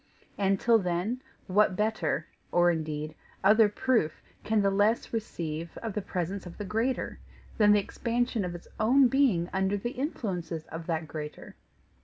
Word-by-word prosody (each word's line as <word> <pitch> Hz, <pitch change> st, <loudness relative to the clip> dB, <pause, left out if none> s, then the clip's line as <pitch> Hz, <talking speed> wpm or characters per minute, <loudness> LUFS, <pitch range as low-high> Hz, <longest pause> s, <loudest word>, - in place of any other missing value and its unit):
And 195 Hz, -1 st, +1 dB
till 230 Hz, -1 st, +4 dB
then 185 Hz, +7 st, -1 dB, 0.2 s
what 190 Hz, 0 st, +3 dB
better 180 Hz, -7 st, 0 dB, 0.3 s
or 175 Hz, 0 st, +5 dB
indeed 155 Hz, -2 st, -3 dB, 0.3 s
other 210 Hz, +2 st, +6 dB
proof 210 Hz, -8 st, 0 dB, 0.2 s
can 215 Hz, -1 st, +2 dB
the 195 Hz, -, +3 dB
less 205 Hz, +5 st, +2 dB
receive 170 Hz, -7 st, -4 dB
of 225 Hz, -3 st, -4 dB
the 210 Hz, -, -2 dB
presence 185 Hz, +1 st, -3 dB
of 175 Hz, -, -10 dB
the 205 Hz, -, -5 dB
greater 225 Hz, +6 st, -1 dB, 0.4 s
than 210 Hz, -1 st, +6 dB
the 210 Hz, -, +6 dB
expansion 235 Hz, +1 st, -1 dB
of 175 Hz, -1 st, -4 dB
its 175 Hz, -, -10 dB
own 250 Hz, +4 st, +5 dB
being 240 Hz, -11 st, +3 dB
under 190 Hz, +1 st, +1 dB
the 240 Hz, +4 st, -3 dB
influences 185 Hz, -, -3 dB
of 165 Hz, 0 st, -7 dB
that 160 Hz, -2 st, -1 dB
greater? 150 Hz, -1 st, -7 dB
195 Hz, 160 wpm, -29 LUFS, 170-225 Hz, 0.4 s, other